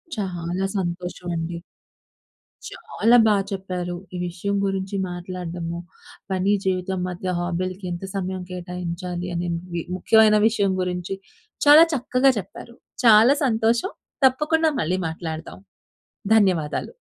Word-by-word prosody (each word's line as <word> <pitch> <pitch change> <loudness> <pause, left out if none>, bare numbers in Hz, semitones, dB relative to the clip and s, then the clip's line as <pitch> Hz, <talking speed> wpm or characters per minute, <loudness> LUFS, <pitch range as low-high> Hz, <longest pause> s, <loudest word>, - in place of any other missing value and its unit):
చాలా 180 -2 -3
సంతోషం 180 -1 -4
అండి. 170 +1 -4 1.1
చాలా 235 +3 +2
బా 210 - +4 0.2
చెప్పారు. 180 -2 -4 0.2
ఈ - - -3
విషయం 195 +4 -3
గురించి 195 0 -2
మాట్లాడడము 175 -1 -5 0.5
పని 190 +2 +2
జీవితం 185 0 -1
మధ్య 180 +1 -3
హాబీ‌లకీ 185 +2 -3
ఎంత 175 +2 -5
సమయం 190 -1 -3
కేటాయించాలి. 180 0 -5
అనేవి 170 0 -3
ముఖ్యమైన 215 +3 +5
విషయం 200 -4 +1
గురించి 180 +1 -3 0.5
చాలా 295 +3 +9
చక్కగా 260 +1 +3
చెప్పారు. 235 +4 -10 0.3
చాలా 225 +4 +8
సంతోషం 230 - +1 0.3
తప్పకుండా 310 +4 +3
మళ్ళీ 180 +4 0
మాట్లాడదాం. 160 - -6 0.8
ధన్యవాదాలు. 185 - +1
185 Hz, 105 wpm, -23 LUFS, 175-210 Hz, 1.1 s, చాలా